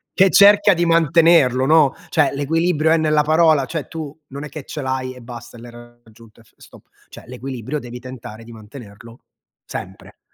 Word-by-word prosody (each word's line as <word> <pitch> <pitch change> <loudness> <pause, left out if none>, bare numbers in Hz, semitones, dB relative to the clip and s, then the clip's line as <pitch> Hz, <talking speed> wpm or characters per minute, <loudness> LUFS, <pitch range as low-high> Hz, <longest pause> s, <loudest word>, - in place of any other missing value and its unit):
che 195 -1 +4
cerca 205 +1 +6
di 175 -1 -1
mantenerlo, 165 -5 +3
no. 155 -2 +4
Cioè, 160 -4 +1
l'equilibrio 160 +2 0
è 165 - +4
nella 155 -1 +1
parola, 155 -2 +3
cioè, 155 -3 -5
tu 155 -2 -8
non 140 +2 -8
è - - -10
che 150 +1 -9
ce 150 +2 -7
l'hai 130 -1 -4
e 125 - -14
basta 120 0 -11
e - - -13
l'hai 120 0 -12
raggiunto 120 -2 -18
e - - -19
f - - -29
stop. - - -18 0.2
Cioè, - - -14
l'equilibrio 130 +2 -6
devi 125 -1 -10
tentare 120 -3 -11
di 115 - -13
mantenerlo 115 +1 -14 0.5
sempre. - - -10
135 Hz, 185 wpm, -19 LUFS, 120-160 Hz, 0.5 s, cerca